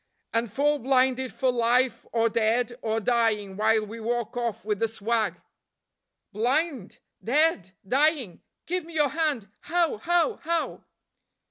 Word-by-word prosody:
"And 230 -1 0
fall 290 +5 +1
blinded 260 0 +2
for 255 +5 +1
life 240 0 +1
or 230 -1 +2
dead 230 +2 +1
or 220 0 0
dying 220 -4 +1
while 215 +1 +2
we 225 +2 -8
walk 235 +1 -2
off 235 -3 -3
with 210 -2 -1
the 225 - +2
swag." 225 0 -1 0.9
"Blind, 255 - -1 0.3
dead, 250 - +2
dying! 275 - +1 0.2
give 360 0 -2
me 335 +1 -12
your 295 -2 +3
hand. 295 -8 -1
How? 340 -7 0
how? 345 - +1
how?" 335 +1 -2
240 Hz, 135 wpm, -26 LUFS, 220-290 Hz, 0.9 s, your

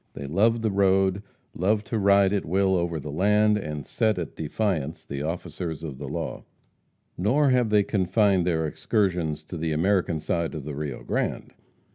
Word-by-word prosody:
They 70 - -6
loved 110 +10 +2
the 110 - +1
road, 95 0 +2 0.3
loved 105 +4 0
to 115 - -2
ride 100 0 +4
at 100 - 0
will 95 +3 +2
over 85 -2 -1
the 75 +1 -6
land, 105 +5 +3
and 75 -6 -5
set 110 - 0
at 85 -3 -5
defiance 80 -2 -2
the 70 0 -5
officers 80 +1 -4
of 70 -5 -6
the 70 - -6
law. - - -4 0.8
Nor 135 +9 +3
have 125 -3 +2
they 105 -1 +4
confined 100 -1 +2
their 80 -2 +1
excursions 85 -2 -1
to 85 +3 -7
the 80 0 -1
American 85 0 +1
side 85 +1 -2
of 75 - -5
the 75 - -5
Rio 75 -1 -5
Grande. - - -2
90 Hz, 175 wpm, -25 LUFS, 80-100 Hz, 0.8 s, ride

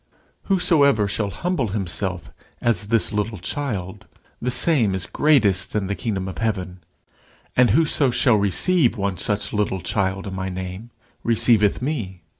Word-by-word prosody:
Whosoever 140 - +3
shall 100 0 -2
humble 175 - -2
himself 95 - -3 0.3
as 105 -4 0
this 115 0 +1
little 105 +1 -2
child, 105 -2 -4 0.3
the 125 - -1
same 125 - +4
is 90 -2 -2
greatest 110 - +2
in 105 -2 0
the 100 - -2
kingdom 95 -1 -3
of 95 -4 -7
heaven. 95 -5 -3 0.8
And 125 -1 +4
whoso 145 +2 +3
shall 125 -2 +3
receive 120 - +2
one 100 -3 -2
such 105 -1 -1
little 105 -3 -1
child 95 0 -2
in 100 - -6
my 95 0 -4
name 95 +4 -7 0.3
receiveth 115 -1 +2
me. 110 - -4
105 Hz, 145 wpm, -22 LUFS, 95-120 Hz, 0.8 s, same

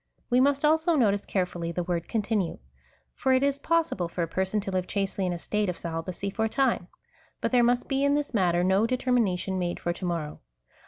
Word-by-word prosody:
We 245 - +5
must 280 +2 +3
also 320 +2 +3
notice 205 -7 +2
carefully 175 -3 -2
the 175 +1 -2
word 170 -1 -2
continue; 210 -5 -1 0.6
for 265 - +1
it 260 +1 +3
is 280 0 +1
possible 320 - 0
for 170 +1 -3
a - - -2
person 190 +5 -1
to 195 - -5
live 185 -1 -1
chastely 195 -1 -1
in - - 0
a - - -3
state 210 +3 -1
of 180 - -3
celibacy 170 +4 -4
for 220 +3 0
a - - -1
time, 255 -9 +1 0.5
but - - -1
there 250 -1 +5
must 245 +1 +2
be 270 0 0
in 280 0 +3
this 290 -3 -2
matter 175 -4 +2
no 190 +4 +3
determina 245 -6 +1
tion 190 +1 -3
made 175 -1 -2
for 175 - -1
to 180 - -11
morrow. 165 -4 -3
200 Hz, 220 wpm, -27 LUFS, 180-255 Hz, 0.6 s, We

